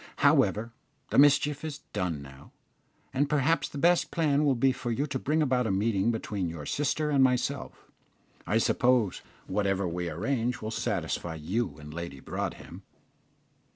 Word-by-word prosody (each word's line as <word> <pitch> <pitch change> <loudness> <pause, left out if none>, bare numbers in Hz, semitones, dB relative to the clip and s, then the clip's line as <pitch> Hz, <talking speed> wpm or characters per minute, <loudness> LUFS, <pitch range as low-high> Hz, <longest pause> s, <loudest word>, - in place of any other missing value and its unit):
"However, 115 +3 +3 0.4
the - - +4
mischief 145 +1 +4
is 150 -2 -5
done 80 -6 -2
now, 70 0 -14 0.6
and 140 +2 +1
perhaps 150 +2 +2
the - - -8
best 175 +4 +3
plan 150 -3 +2
will 140 -3 +3
be 130 +3 +3
for 125 -1 -5
you 125 +5 0
to 130 -3 -3
bring 155 +4 +1
about 125 -4 +1
a - - 0
meeting 100 +1 +1
between 105 -5 -2
your 80 -3 -7
sister 150 - 0
and 140 -2 +4
myself. 125 -1 -1 0.6
I 110 - +2
suppose 120 -3 +2 0.2
whatever 95 -1 0
we 85 0 -3
arrange 115 - -1
will 110 - -5
satisfy 85 -6 -2
you 80 +2 -2
and 75 0 -10
Lady 85 -5 -6
Broadhem?" - - -5
115 Hz, 155 wpm, -28 LUFS, 90-140 Hz, 0.6 s, the